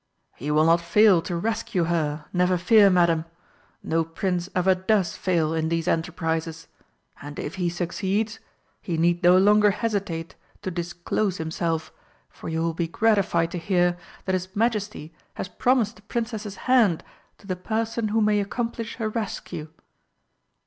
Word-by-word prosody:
"He 145 - -5
will 155 +1 +4
not 165 +1 +4
fail 185 +1 +5
to 175 - -4
rescue 220 0 -1
her, 155 -3 -1
never 180 0 +2
fear, 200 +3 +6
Madam. 170 -3 +3 0.6
No 165 0 +1
Prince 180 +2 -2
ever 185 +1 +4
does 185 0 0
fail 165 -4 0
in 160 0 0
these 165 -1 -1
enterprises. 165 -1 -2 0.5
And 145 0 -8
if 145 - -4
he 175 - +1
succeeds 190 +5 -2 0.4
he 170 -3 -3
need 175 +2 +2
no 180 0 +6
longer 210 +2 +5
hesitate 200 -6 -2 0.3
to 185 - -3
disclose 175 +3 -2
himself, 160 0 -2 0.4
for - - -8
you 160 0 -1
will 165 0 0
be 165 +1 -2
gratified 185 -4 +2
to 175 - -3
hear 175 0 +2 0.3
that 190 - -1
his 185 0 -3
Majesty 210 -7 -1 0.2
has - - -4
promised 235 +2 +1
the - - -17
Princess's 220 -2 -4
hand 235 -10 +4 0.3
to - - -20
the 185 -2 -2
person 225 +4 -2
who 220 +1 +1
may 210 -1 +3
accomplish 230 +3 -3
her 225 -3 -2
rescue. 215 -8 -4
180 Hz, 155 wpm, -25 LUFS, 165-210 Hz, 0.6 s, fear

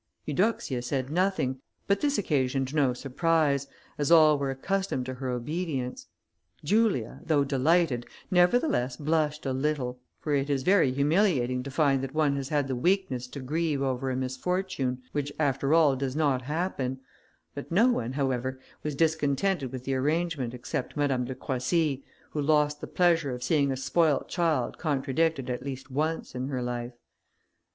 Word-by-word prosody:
Eudoxia 150 - 0
said 130 +2 -2
nothing, 170 -8 0 0.2
but 200 0 +1
this 285 -1 +1
occasioned 135 -7 0
no 145 -4 +3
surprise, 140 +2 +1 0.3
as 145 - +1
all 155 -2 +7
were 140 -1 -1
accustomed 135 0 -2
to 130 - -4
her 130 0 -5
obedience. 130 +1 -3 0.6
Julia, 205 - +1
though 150 -3 +2
delighted, 140 -2 +2 0.2
nevertheless 180 - +3
blushed 150 0 0
a 135 - 0
little, 130 -2 -1 0.2
for 150 - -2
it 140 0 +1
is 135 -2 0
very 180 -7 +4
humiliating 140 -3 +2
to 135 - -6
find 140 -2 +2
that 135 +2 -5
one 150 -3 +2
has 135 -1 -4
had 145 -3 +1
the 130 - -2
weakness 135 -4 0
to 140 +2 -8
grieve 150 +1 -1
over 130 0 -1
a 130 - -1
misfortune, 130 0 -2
which 145 -1 -2
after 140 -2 0
all 155 -4 +5
does 135 0 -3
not 145 -5 +2
happen; 135 -3 -2 0.5
but 140 - -8
no 220 +9 +5
one, 125 - -1
however, 130 -2 -1 0.2
was 150 -2 -3
discontented 155 0 +1
with 130 -1 -6
the 135 - -2
arrangement 145 -2 -1
except 125 +3 -4
Madame 135 -4 +1
de 130 +1 -5
Croissy, 135 +2 -1 0.3
who 150 - -2
lost 150 0 +2
the - - -5
pleasure 170 -7 +2
of 125 - -7
seeing 140 0 +2
a 130 - -2
spoiled 150 +1 +1
child 160 -8 0
contradicted 145 -1 0
at 125 -1 -3
least 135 0 -7
once 155 +4 -2
in 130 +1 -3
her 130 -3 -2
life. 120 0 -4
140 Hz, 160 wpm, -28 LUFS, 130-160 Hz, 0.6 s, all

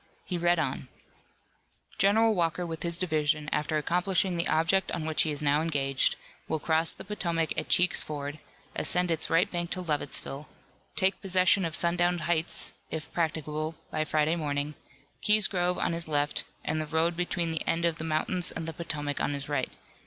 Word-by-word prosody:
He 185 - -3
read 175 0 +2
on: - - -2 1.1
General 220 +3 +4
Walker 175 -1 0
with 165 -1 -5
his 170 -1 +3
division, 155 -4 0
after 150 +1 0
accomplishing 180 +4 +1
the 170 0 0
object 165 +4 +2
on 165 -3 -2
which 155 -1 +1
he 155 - +1
is 150 0 -2
now 145 +1 +3
engaged, 140 -4 +1 0.3
will 160 - 0
cross 160 +2 +2
the - - -8
Potomac 170 -6 -1
at - - -3
Cheek's 180 0 +4
Ford, 145 0 -5 0.4
ascend 180 -1 +1
its 160 -1 +1
right 165 +5 +4
bank 175 -1 -2
to 185 - -2
Lovettsville, 145 -2 -3 0.5
take 190 +1 +1
possession 185 0 +3
of 160 -1 -2
Sundown 175 +1 +2
Heights, 170 0 0 0.2
if 160 0 -6
practicable, 155 -1 -2 0.2
by 155 - 0
Friday 155 +1 +1
morning, 145 -2 -2 0.5
Key's 210 -1 +5
Grove 180 -1 +1
on - - 0
his 165 0 -4
left, 145 -1 0 0.2
and 155 +1 0
the 155 - -4
road 160 +2 +1
between 175 -1 -1
the 160 - -2
end 170 +1 +1
of 165 -1 0
the - - -4
mountains 160 +3 0
and 165 -1 -5
the 165 - -3
Potomac 150 -3 -3
on 145 - 0
his 140 -1 -4
right. 145 -3 -1
165 Hz, 180 wpm, -29 LUFS, 155-175 Hz, 1.1 s, Key's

